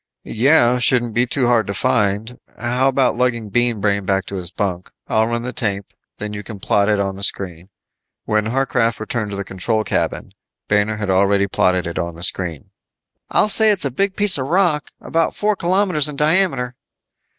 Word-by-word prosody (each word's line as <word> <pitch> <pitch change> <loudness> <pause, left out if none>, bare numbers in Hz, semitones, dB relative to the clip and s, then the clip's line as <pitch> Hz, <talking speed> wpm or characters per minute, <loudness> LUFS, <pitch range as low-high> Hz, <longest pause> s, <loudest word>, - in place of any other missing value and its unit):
"Yeah. 125 0 +3
Shouldn't 120 -2 +2
be 120 +2 +2
too 130 +1 0
hard 120 -2 +2
to 100 - -4
find. 105 +3 0 0.2
How 125 +2 0
about 135 -1 +2
lugging 120 -3 0
Bean 120 0 +2
Brain 100 0 0
back 95 0 0
to 100 - -7
his 90 -3 -3
bunk. 90 -2 -3 0.2
I'll 110 0 +1
run 120 0 -2
the 125 +1 -4
tape, 100 -4 -3 0.2
then 105 0 -5
you 105 - -5
can 105 0 -9
plot 100 +1 +1
it 105 -1 +2
on 95 -1 -2
the 100 - -7
screen." 90 -3 -2 0.6
When 105 0 0
Harcraft 115 -2 0
returned 110 -1 -3
to 100 - -5
the 100 - -3
control 110 +4 -2
cabin, - - -2 0.4
Banner 105 +1 +1
had 100 -3 -2
already 100 +1 +3
plotted 90 -2 +1
it 85 - -4
on 85 -1 -4
the 85 - -8
screen. 85 -5 -2 0.6
"I'll - - +2
say 220 +1 +5
it's 200 -7 +1
a 140 - -1
big 195 +8 -1
piece 205 -7 +3
of 130 - -3
rock! 170 -3 +1
About 165 0 -1
four 210 0 0
kilometers 180 -4 +1
in 150 - -7
diameter." 150 -5 +1
115 Hz, 195 wpm, -19 LUFS, 100-135 Hz, 0.6 s, say